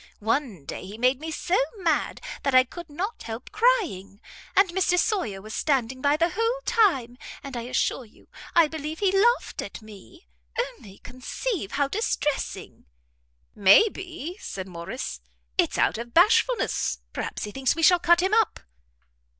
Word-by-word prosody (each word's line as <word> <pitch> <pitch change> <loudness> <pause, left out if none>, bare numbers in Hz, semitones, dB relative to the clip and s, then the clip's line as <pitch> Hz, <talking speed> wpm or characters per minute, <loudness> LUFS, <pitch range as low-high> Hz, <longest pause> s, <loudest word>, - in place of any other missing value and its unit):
One 220 - -2
day - - -6
he 205 +3 -9
made 255 +2 +2
me 320 +2 -6
so 350 +3 0 0.2
mad, 330 -6 0 0.2
that 275 -2 0
I 255 - +8
could 340 +6 -10
not 365 +10 -4
help 230 +2 -7
crying; 355 - +1 0.4
and 390 +1 +6
Mr 360 0 +1
Sawyer 335 - 0
was 215 0 -8
standing 260 -3 0
by 285 +2 +3
the 335 +2 +2
whole 455 +5 0
time! 270 - +2 0.2
and 275 -2 -7
I 240 - -3
assure 255 - 0
you 215 - -22 0.3
I 335 -2 +6
believe 310 0 -5
he 395 0 +2
laughed 460 +6 +2
at - - -7
me. 215 - -15 0.3
Only 460 - -5
conceive 255 - -5
how 285 -1 +1
distressing!" 295 -5 -2 0.7
"May 200 - +6
be," 355 -2 -7
said 190 -1 -6
Morrice, 170 - -6 0.3
"it's - - +1
out - - +2
of 235 0 -8
bashfulness 445 +7 +3
perhaps - - -4
he 210 - -5
thinks 265 +2 0
we 330 - -2
shall 355 +2 +6
cut 345 0 +4
him 380 +2 +1
up." 445 -3 +2
300 Hz, 160 wpm, -25 LUFS, 235-375 Hz, 0.7 s, I